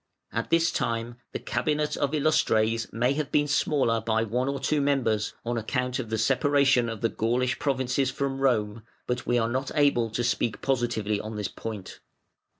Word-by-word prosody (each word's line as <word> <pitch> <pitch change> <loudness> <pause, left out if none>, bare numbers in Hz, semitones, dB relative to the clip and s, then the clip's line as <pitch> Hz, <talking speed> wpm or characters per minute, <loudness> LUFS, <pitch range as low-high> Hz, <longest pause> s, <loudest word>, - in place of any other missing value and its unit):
At - - -3
this 165 +1 +3
time 115 -4 -2
the - - -3
Cabinet 150 -1 -1
of 145 +1 0
Illustres 115 -7 +2
may 125 +4 +1
have 150 -1 -3
been 145 0 +2
smaller 140 -5 +1
by 110 0 +1
one 125 +4 -1
or 140 0 -2
two 150 +2 +1
members, 125 -7 +1
on 120 0 -1
account 125 +3 -2
of 120 -4 -4
the 110 - -1
separation 135 +1 +3
of 115 -2 -6
the 115 - +2
Gaulish 125 +4 0
provinces 130 -1 0
from 135 0 -2
Rome, 110 -5 +1 0.2
but 125 0 -3
we 120 - +2
are 115 -1 +2
not 130 +3 -2
able 140 -6 +3
to 120 +3 -2
speak 120 -2 0
positively 115 -6 0
on 110 0 -6
this 105 -3 -3
point. 110 -4 -7
125 Hz, 180 wpm, -27 LUFS, 115-140 Hz, 0.2 s, this